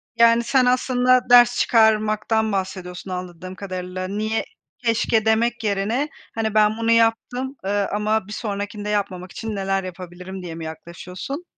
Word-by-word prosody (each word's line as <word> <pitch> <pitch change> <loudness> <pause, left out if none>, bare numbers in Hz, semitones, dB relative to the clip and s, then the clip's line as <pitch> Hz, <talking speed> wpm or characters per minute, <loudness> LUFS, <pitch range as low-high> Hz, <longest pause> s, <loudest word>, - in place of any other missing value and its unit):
Yani 230 0 +5
sen 250 +2 +3
aslında 250 0 +2
ders 245 0 +7
çıkarmaktan 220 -1 +2
bahsediyorsun 185 -1 -4
anladığım 180 0 -6
kadarıyla. 185 -1 -5
Niye, 215 +3 -1 0.4
keşke 230 -2 +1
demek 230 +1 +1
yerine 215 +8 0 0.3
hani 220 -1 -1
ben 215 0 +3
bunu 230 0 +1
yaptım, 230 +4 +1
eee, 200 0 0
ama 210 0 0
bir 210 - -7
sonrakinde 205 -1 -4
yapmamak 190 -3 -2
için 225 -2 -5
neler 195 -1 -1
yapabilirim 180 +1 -8
diye 165 -2 -6
mi 165 -1 -6
yaklaşıyorsun? 180 - -7
210 Hz, 140 wpm, -22 LUFS, 185-230 Hz, 0.4 s, ders